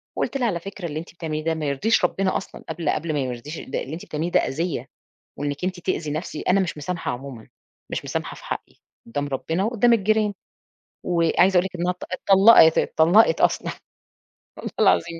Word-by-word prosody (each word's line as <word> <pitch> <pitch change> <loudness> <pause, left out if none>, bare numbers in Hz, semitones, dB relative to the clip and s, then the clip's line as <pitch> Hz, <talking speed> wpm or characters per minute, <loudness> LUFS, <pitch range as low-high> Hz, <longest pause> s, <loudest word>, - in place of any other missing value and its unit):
وقُلت 275 - -1
لها 245 - +1
على 180 -6 -1
فكرة 195 +1 -8
اللي 155 0 -4
أنتِ 170 - -10
بتعمليه 155 -3 -4
ده 165 - +1
ما 155 - -4
يرضيش 160 +9 +2
ربنا 190 +1 0
أصلًا - - -9
قبل 165 -3 -2
قبل 165 - -1
ما 150 - 0
ما 135 - 0
يرضيش 130 +5 -6
ال - - -10
ده - - -1
اللي 140 - -7
أنتِ 170 - -7
بتعمليه 160 +3 -3
ده - - +4
أذيّة، 165 +3 -3 0.5
وإنِك 145 +1 -4
أنتِ 185 -1 -3
تأذي 170 -4 -2
نَفْسي 155 +4 -4
أنا 190 +2 +2
مش 180 -5 -2
مسامحة 165 +1 -3
عمومًا، 125 -2 -8 0.4
مش - - -4
مسامحة - - -4
في - - -14
حقي - - -6 0.3
قدّام 145 +5 -3
ربنا 160 +6 -2
وقدّام 235 +2 +3
الجيران. 215 0 +2 0.7
وعايزة 175 +2 +3
أقول 180 - +3
لِك 190 - -6
إنها 175 +1 0
اتط 180 - -9
اتطلقت، 195 -3 +6
اتطلقت 175 +8 +4
أصلًا. - - +2 0.9
والله - - -6
العظيم 170 -1 +3
170 Hz, 195 wpm, -23 LUFS, 150-190 Hz, 0.9 s, اتطلقت